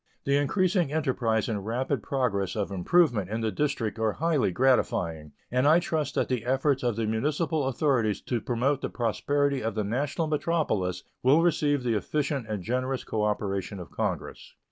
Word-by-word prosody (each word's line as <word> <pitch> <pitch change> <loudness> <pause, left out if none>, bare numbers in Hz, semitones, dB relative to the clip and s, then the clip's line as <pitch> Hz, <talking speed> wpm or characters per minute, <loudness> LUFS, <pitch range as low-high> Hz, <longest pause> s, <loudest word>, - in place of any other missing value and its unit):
The 140 - +2
increasing 175 +2 +1
enterprise 130 -8 0
and 105 -4 -2
rapid 125 +4 -1
progress 105 -8 -1
of 100 -2 -2
improvement 105 - +2
in 110 +2 -2
the 110 -1 0
District 115 -3 -1
are 110 -2 +1
highly 160 - +1
gratifying, 85 - +1 0.2
and 125 +3 +2
I 155 +3 +7
trust 160 -4 -2
that - - +1
the 125 -3 -1
efforts 135 +2 +1
of 120 -3 0
the 115 0 -1
municipal 145 +6 0
authorities 125 -5 +1
to 120 -3 -2
promote 130 +5 0
the - - -2
prosperity 140 +4 0
of 110 -1 -2
the 105 - 0
national 140 - -1
metropolis 145 - -1 0.2
will 145 +6 +5
receive 145 -5 +2
the 120 -2 +1
efficient 140 - -1
and 105 -4 -3
generous 130 +4 -1
cooperation 105 -2 -2
of 85 -5 -9
Congress. - - -4
125 Hz, 165 wpm, -27 LUFS, 110-145 Hz, 0.2 s, I